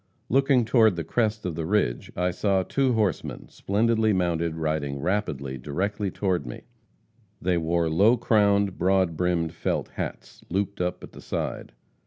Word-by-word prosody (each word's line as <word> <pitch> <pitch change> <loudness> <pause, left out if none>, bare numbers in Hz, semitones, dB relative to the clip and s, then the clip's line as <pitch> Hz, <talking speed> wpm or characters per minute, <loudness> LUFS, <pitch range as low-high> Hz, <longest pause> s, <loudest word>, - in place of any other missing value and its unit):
Looking 135 -1 +3
toward 110 -4 +4
the 85 - -3
crest 110 0 -1
of 90 - -2
the 80 0 -4
ridge, 90 -12 0
I 90 +1 0
saw 95 +1 +1
two 135 +5 +1
horsemen, 105 -7 -1
splendidly 110 +1 +1
mounted, 85 -3 0
riding 75 -3 -2
rapidly 70 -7 -2
directly 95 +9 -2
toward 95 -1 -1
me. - - -8 0.8
They 90 -1 +1
wore 85 +1 +1
low 100 +10 +4
crowned, 100 -4 +2
broad 95 -2 +2
brimmed 85 -1 0
felt - - -2
hats, - - -7
looped 100 +1 -2
up 90 0 -2
at - - -10
the - - -12
side. - - -4
95 Hz, 155 wpm, -26 LUFS, 85-105 Hz, 0.8 s, toward